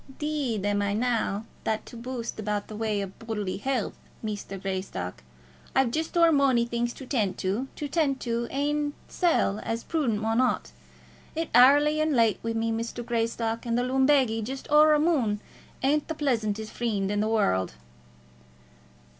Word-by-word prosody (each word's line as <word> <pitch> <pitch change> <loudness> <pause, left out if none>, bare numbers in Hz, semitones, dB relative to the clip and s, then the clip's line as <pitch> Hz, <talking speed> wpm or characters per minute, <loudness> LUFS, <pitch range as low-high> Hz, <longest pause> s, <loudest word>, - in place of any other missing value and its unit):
"'Deed 280 -9 -1
am 205 0 +1
I 200 0 0
nae 225 -3 0 0.2
that 220 -1 -1
to - - -11
boost 235 -1 -5
about 210 -1 -1
in - - -25
the 215 - -7
way 215 -2 -1
of 195 -1 -7
bodily 210 -4 -3
heelth, 260 -2 -1 0.3
Muster 205 -2 -4
Greystock. 185 - -4 0.5
I've 265 -3 +3
just 320 +5 -2
o'er 335 -1 +6
mony 270 -5 +4
things 235 0 -1
to 265 - -10
tent 220 -8 0
to, 200 +8 -1
to 295 - -4
tent 285 -3 +1
to 235 0 -1
my - - -14
ain 290 +1 0
sell 325 - +1
as 230 0 -3
a - - -25
prudent 270 -10 0
mon 225 +3 +1
ought. 255 - 0 0.6
It's 325 0 -2
airly 290 +5 +6
an' 310 -1 +1
late 230 -4 +3
wi' 230 0 -1
me, 225 0 0
Muster 230 +1 -3
Greystock; 230 -1 -1
and 235 -1 0
the 245 - +2
lumbagy 260 -3 +3
just 265 +5 -5
a' - - +1
o'er 305 +1 +7
a - - +2
mon 270 -11 +2 0.4
isn't 290 +2 +2
the 320 - -3
pleasantest 220 -7 -1
freend 205 -5 -1
in 205 - 0
the 215 - +1
warld." 95 - +1
235 Hz, 180 wpm, -27 LUFS, 215-275 Hz, 0.6 s, o'er